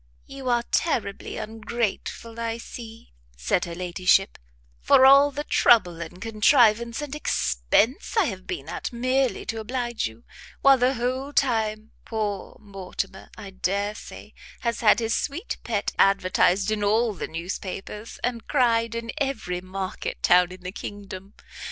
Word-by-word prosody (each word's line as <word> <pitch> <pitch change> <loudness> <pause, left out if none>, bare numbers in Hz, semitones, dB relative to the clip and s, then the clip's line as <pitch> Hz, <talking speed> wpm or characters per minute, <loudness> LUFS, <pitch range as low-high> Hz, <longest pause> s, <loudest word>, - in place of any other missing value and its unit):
"You 270 -2 -6
are 240 -1 +2
terribly 225 - -1
ungrateful, 225 +1 -4
I 230 0 -2
see," 230 - -10 0.2
said 60 - 0
her 170 -1 -7
ladyship, 180 +2 +1 0.4
"for 260 - +5
all 275 +2 +8
the 290 +1 -5
trouble 180 - +4
and 170 +2 -8
contrivance 230 +3 +3
and 290 -1 -6
expence 225 - 0
I 425 - +5
have 190 -8 -5
been 140 - -5
at - - -4
merely 255 +2 0
to 225 - -3
oblige 240 - -2
you, 110 +1 -14 0.4
while 275 -1 +6
the 255 +2 +2
whole 255 +4 -2
time, 220 -5 0
poor 210 -3 -4
Mortimer, 195 -1 -6
I 195 - -9
dare 200 +2 -1
say, - - -11 0.3
has 235 -1 -1
had 210 -2 +5
his 225 -1 -1
sweet 315 - -3
Pet 210 -4 -1
advertised 195 0 +3
in 210 -1 -1
all 220 +2 +2
the 185 - -5
newspapers, 190 +5 -6
and 240 -2 -2
cried 230 -4 +2
in 230 0 -4
every 220 -11 -2
market 185 0 -5
town 180 0 +5
in 185 0 -11
the 180 0 -6
kingdom. 200 0 -8
220 Hz, 145 wpm, -25 LUFS, 190-240 Hz, 0.4 s, all